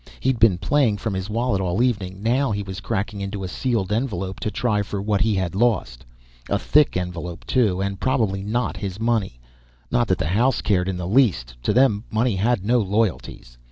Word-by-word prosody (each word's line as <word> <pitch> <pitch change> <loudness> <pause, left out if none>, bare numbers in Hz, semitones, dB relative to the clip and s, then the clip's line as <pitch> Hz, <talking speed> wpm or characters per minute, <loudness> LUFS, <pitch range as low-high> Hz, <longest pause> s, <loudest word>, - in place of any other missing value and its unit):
He 130 - 0
had 125 -3 0
been 110 -6 +5
playing 120 +1 +2
from 105 +1 -3
his 95 +1 -4
wallet 115 -2 0
all 95 +5 0
evening, 100 -6 -2
now 130 +4 +2
he 100 0 -2
was 95 -1 -6
cracking 105 -1 -3
into 100 0 -4
a - - -3
sealed 105 -1 -1
envelope 95 -5 -2
to - - -2
try 105 0 0
for 100 0 -4
what 100 0 0
he 110 -2 +2
had 95 -2 -1
lost. 95 - 0 0.5
A - - +2
thick 150 -9 +3
envelope 90 -1 -5
too, 100 -7 +1
and 100 0 -3
probably 110 -7 0
not 115 +5 -2
his 100 -1 -5
money. 110 - 0 0.5
Not - - +2
that - - +1
the - - -2
house 115 +10 +2
cared 95 -3 +1
in 95 - -3
the 90 -1 -4
least. 95 - +2
To - - 0
them 110 -3 +3
money 110 0 +1
had 105 0 +1
no 120 +3 +3
loyalties. 100 - -2
100 Hz, 205 wpm, -22 LUFS, 95-115 Hz, 0.5 s, been